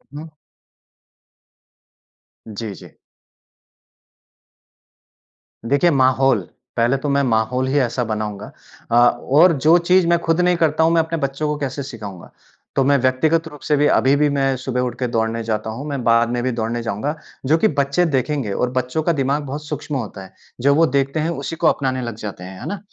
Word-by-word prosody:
हुँ। 155 +2 -8 2.2
जी, 110 -1 -6
जी। - - -14 2.8
देखिए 140 +6 +3
माहौल, 130 -3 +3 0.4
पहले 120 +4 +2
तो 145 +2 -3
मैं 140 0 +2
माहौल 125 +1 0
ही 140 +2 +2
ऐसा 125 -1 0
बनाऊँगा। 105 -2 -4 0.5
अ, - - +2
और 130 +8 +4
जो 155 +4 +4
चीज़ 180 +1 +3
मैं 170 0 +4
खुद 165 0 0
नहीं 180 0 +3
करता 160 -1 +2
हूँ 165 - +3
मैं 165 - +4
अपने 165 +1 -3
बच्चों 140 +1 -2
को 150 0 -1
कैसे 140 0 -3
सिखाऊँगा? 105 -9 -9 0.5
तो 135 - +3
मैं 140 +1 +3
व्यक्तिगत 145 +6 +1
रूप 150 -3 -12
से 150 - +3
भी 145 +1 +3
अभी 135 +2 +3
भी 150 +1 +2
मैं 135 -1 +1
सुबह 125 0 -2
उठकर 125 0 -2
दौड़ने 115 0 -1
जाता 110 -1 -2
हूँ। 115 +6 -6
मैं 140 -3 -3
बाद 115 0 +3
में 120 0 -1
भी 130 - 0
दौड़ने 115 0 -2
जाऊँगा। 115 +7 -3 0.3
जो 155 +5 +3
कि 190 - +3
बच्चे 140 0 +1
देखेंगे 135 -5 -1
और 125 - 0
बच्चों 130 +4 -2
का 170 - +2
दिमाग 140 0 0
बहुत 145 +3 -6
सूक्ष्म 150 0 -5
होता 110 -6 -5
है। 95 - -14 0.3
जो 140 +2 +4
वो 165 +2 +5
देखते 140 +2 +1
हैं 155 +2 0
उसी 165 0 -4
को 165 0 +1
अपनाने 130 -4 0
लग 120 -3 -5
जाते 105 -4 -7
हैं। 95 +1 -9
है - - -7
ना? 205 - -4
135 Hz, 185 wpm, -20 LUFS, 120-150 Hz, 2.8 s, वो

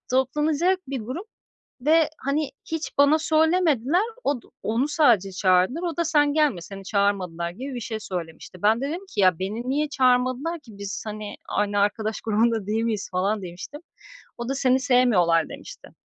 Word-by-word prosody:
Toplanacak 300 +8 +1
bir 270 -2 -3
grup 255 - -6 0.5
ve, 315 +4 +4
hani, 280 +1 -1 0.2
hiç 320 -3 -4
bana 285 +2 +5
söylemediler. 320 - +2 0.2
Od 275 -5 0 0.2
onu 235 +6 0
sadece 240 - +3
çağırdılar; 185 - +2
o 340 -4 -3
da, 340 - +1
"Sen 295 -2 +3
gelme, 295 - +2
seni 195 +1 -9
çağırmadılar." 185 -5 0
gibi 260 +9 -7
bir 245 - -4
şey 220 -1 -5
söylemişti. 175 -1 -7
Ben 220 +3 +3
de 275 - -2
dedim 355 +6 -5
ki, 205 - -2
"Ya, 185 -3 +4
beni 215 +6 -4
niye 300 +2 0
çağırmadılar 255 +4 +1
ki? 235 -7 -15
Biz 200 -1 -5
hani, 215 -1 -6
aynı 205 0 0
arkadaş 215 +2 0
grubunda 225 -1 +1
değil 220 +2 0
miyiz?" 215 -3 -2
falan 195 +3 0
demiştim. 180 +12 -8 0.6
O 235 +1 -5
da, 270 - -1
"Seni 260 -1 +2
sevmiyorlar." 215 -11 +3
demişti. - - -11
245 Hz, 170 wpm, -24 LUFS, 205-295 Hz, 0.6 s, bana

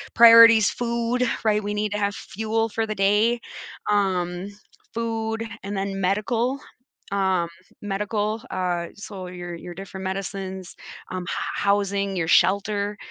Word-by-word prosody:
priorities, 230 -2 +9
food, 235 +1 -1 0.2
right? 210 -1 +2
We 205 +1 -2
need 210 0 -1
to - - -1
have 200 0 0
fuel 220 +2 -2
for 225 +1 -2
the 215 - -3
day, 210 +5 +3 0.5
um, 185 -2 0 0.5
food, 225 -1 -2 0.2
and 200 +1 -4
then 195 0 -2
medical, 225 +7 0 0.5
um, 190 -3 +1 0.3
medical, 210 +2 -2
uh, 175 -2 -1
so 200 -3 -8
your 175 -1 -7
your 175 +1 -9
different 190 +1 -8
medicines, 190 -1 -5 0.4
um, 185 -1 -3
h - - -6 0.3
housing, 200 -1 +1
your 165 -2 -1
shelter. 205 +2 +2
200 Hz, 135 wpm, -24 LUFS, 190-220 Hz, 0.5 s, priorities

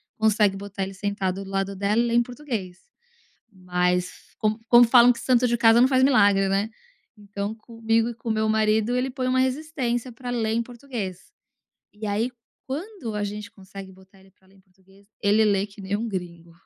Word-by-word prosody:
consegue 210 -2 +2
botar 200 0 -7
ele 190 0 -6
sentado 195 -1 -3
do 195 - -11
lado 195 0 -2
dela 200 +4 +1
e 240 - 0
ler 235 - 0
em 240 - +4
português. 235 -9 -6 0.7
Mas 180 -2 -2
como 215 +1 -1
como 240 0 +8
falam 245 +1 +6
que 235 - -10
santo 250 -1 +2
de 240 - +1
casa 230 0 +5
não 255 - +5
faz 260 -1 +3
milagre, 200 -7 +4
né? 200 +3 0 0.5
Então 205 0 -5
comigo 225 0 -1
e - - -7
com 230 0 -6
meu 220 0 +1
marido 220 +1 +2
ele 250 +1 0
põe 255 0 -3
uma 255 0 +2
resistência 260 -3 -2
pra 245 +2 -9
ler 230 -3 -1
em 230 +1 +1
português. 230 -7 -7 0.6
E 210 +1 -8
aí 210 +4 0 0.4
quando 285 - -5
a 210 - -1
gente 210 +2 -5
consegue 195 -1 -11
botar 190 +1 -20
ele 190 0 -21
pra 190 0 -31
ler 195 - -24
em - - -22
português, 195 +1 -25 0.2
ele 210 +2 +4
lê 200 -1 +2
que 205 0 -14
nem 195 +1 -2
um 225 +3 -3
gringo. 175 -4 -6
215 Hz, 200 wpm, -24 LUFS, 195-240 Hz, 0.7 s, como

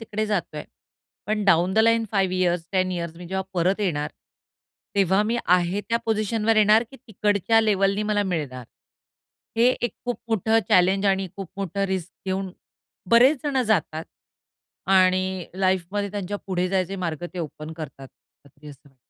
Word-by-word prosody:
तिकडे 215 -1 -3
जात 200 -7 -2
आहे, 150 - -5 0.6
पण 210 0 -1
down 180 -1 +3
the - - +2
line 230 +1 +4
5 190 -2 +1
years, 175 -2 0
10 185 -1 +1
years 170 -2 -4
मी 175 +1 -9
जेव्हा 190 +2 -2
परत 185 +4 +1
येणार 150 -7 -1 0.8
तेव्हा 195 0 +3
मी 225 +3 -1
आहे 180 +2 +2
त्या 230 0 +2
पोझिशनवर 220 0 +1
येणार 215 +1 +5
की 270 - -12
तिकडच्या 215 -2 +1
लेव्हलनी 200 -1 +2
मला 210 -1 +1
मिळणार. 150 -10 -3 0.9
हे 230 - +3 0.2
एक 240 -4 -1
खूप 245 -1 -2
मोठं 225 0 +2
चॅलेंज 190 +2 +4
आणि 195 0 +1
खूप 195 -3 -6
मोठं 195 0 -2
रिस्क 185 -2 -3
घेऊन 190 0 -2 0.6
बरेच 255 +5 +6
जण 275 -3 0
जातात 165 -7 0 0.9
आणि 185 -1 +3
लाईफमध्ये 190 +2 0
त्यांच्या 205 0 -4
पुढे 185 -1 -1
जायचे 190 0 -1
मार्ग 170 -3 -4
ते - - -6
ओपन 155 -1 -6
करतात 135 -4 -8 0.4
अगदी 140 +2 -15
असं 140 -1 -15
190 Hz, 155 wpm, -24 LUFS, 175-210 Hz, 0.9 s, बरेच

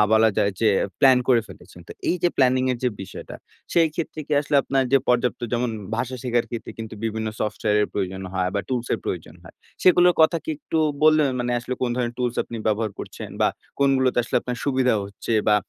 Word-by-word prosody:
বলা 110 0 +6
যায় 100 - +2
যে, 110 - +4 0.3
প্ল্যান 130 -3 +7
করে 120 -3 +5
ফেলেছেন। 90 -1 -14
তো - - -7 0.2
এই 180 - +2
যে, 175 - +5
প্ল্যানিংয়ের 130 -1 +2
যে, 125 - +3
বিষয়টা 95 - -9 0.4
সেই 165 -2 +4
ক্ষেত্রে 155 -2 -4
কি 150 - -4
আসলে 145 0 0
আপনার 135 -1 +1
যে, 135 - +7
পর্যাপ্ত 125 0 +1
যেমন 120 0 0 0.3
ভাষা 130 +2 -2
শেখার 120 -2 0
ক্ষেত্রে 115 -2 -6
কিন্তু 110 -1 -6
বিভিন্ন 110 0 -2
সফটওয়্যারের 105 0 +1
প্রয়োজন 95 -1 -3
হয় 90 -1 0
বা 100 - +1
টুলসের 125 -2 -1
প্রয়োজন - - -5
হয় - - -14 0.3
সেগুলোর 180 -1 +6
কথা 160 +2 +5
কি - - -3
একটু 160 - -3 0.2
বল 155 0 +7 0.2
মানে 120 0 -1
আসলে 125 +2 -4
কোন 125 - 0
ধরনের 120 -1 -1
টুলস 125 -1 -1
আপনি 115 - -7
ব্যবহার 110 0 +1
করছেন? - - -7
বা - - +4 0.3
কোনগুলোতে 130 -2 +3
আসলে - - -1
আপনার 125 0 -4
সুবিধা 130 -4 +2
হচ্ছে 100 +3 -5 0.2
বা 105 - +6
125 Hz, 200 wpm, -23 LUFS, 110-130 Hz, 0.4 s, প্ল্যান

